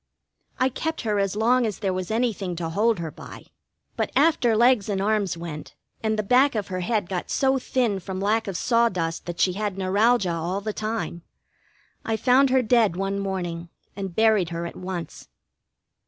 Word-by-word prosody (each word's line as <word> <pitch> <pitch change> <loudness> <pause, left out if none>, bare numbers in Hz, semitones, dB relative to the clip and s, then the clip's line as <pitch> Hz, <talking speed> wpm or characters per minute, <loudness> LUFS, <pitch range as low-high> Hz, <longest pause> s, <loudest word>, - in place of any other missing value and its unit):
I 255 - +3
kept 320 +5 -3
her 210 -3 0
as 195 0 0
long 240 +4 +3
as 215 -4 -2
there 195 -3 -1
was 185 -1 -4
anything 220 -6 -1
to 165 -1 -3
hold 215 +6 +2
her 165 -2 -5
by; - - -11 0.5
but - - -2
after 245 -9 +3
legs 235 -3 +4
and 195 -2 0
arms 205 -3 0
went, 165 -3 -8 0.3
and 220 -1 0
the 215 - 0
back 255 +5 +4
of 210 -2 -2
her 185 -1 -3
head 205 +1 -1
got 180 -1 -4
so 265 0 +2
thin 240 -6 0
from 190 0 -6
lack 215 +3 +1
of 190 -3 -3
sawdust 190 -10 0
that 175 -1 -5
she 185 - +3
had 205 0 -3
neuralgia 195 +1 +2
all 170 +4 -2
the 215 +1 -4
time, 215 -5 -3 0.8
I 225 -1 -1
found 260 +4 +4
her 260 0 +3
dead 225 -5 +3
one 195 +1 -2
morning, 175 -4 -4 0.3
and 195 -3 -5
buried 220 -6 +3
her 170 0 -4
at 170 - -7
once. 180 -3 -6
205 Hz, 185 wpm, -24 LUFS, 185-230 Hz, 0.8 s, legs